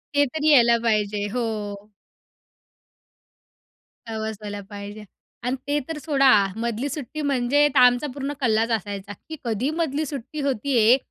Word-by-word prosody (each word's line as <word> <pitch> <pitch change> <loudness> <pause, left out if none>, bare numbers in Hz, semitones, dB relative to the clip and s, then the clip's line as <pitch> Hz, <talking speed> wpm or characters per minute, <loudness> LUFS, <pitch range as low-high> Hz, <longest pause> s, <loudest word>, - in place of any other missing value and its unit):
ते 285 - +5
तरी 310 0 +1
यायला 235 -4 +6
पाहिजे 210 -2 +1
हो. 250 - -1 2.7
कव्हर 220 0 -3
व्हायला 205 -1 -6
पाहिजे 205 +1 -8 0.4
आणि 250 +2 0
ते 290 +1 +1
तर 320 - -3
सोडा. 275 -3 +3 0.2
मधली 235 +4 -2
सुट्टी 290 +1 -5
म्हणजे 285 +1 +2
तर 265 - +6
आमचा 250 +3 +5
पूर्ण 280 0 -4
कल्लाच 225 -2 +2
असायचा, 205 -1 -3 0.2
की 315 - -5
कधी 235 +4 -1
मधली 315 -2 -1
सुट्टी 285 +1 -6
होती 275 -1 0
आहे 230 +4 +6
245 Hz, 140 wpm, -23 LUFS, 220-285 Hz, 2.7 s, यायला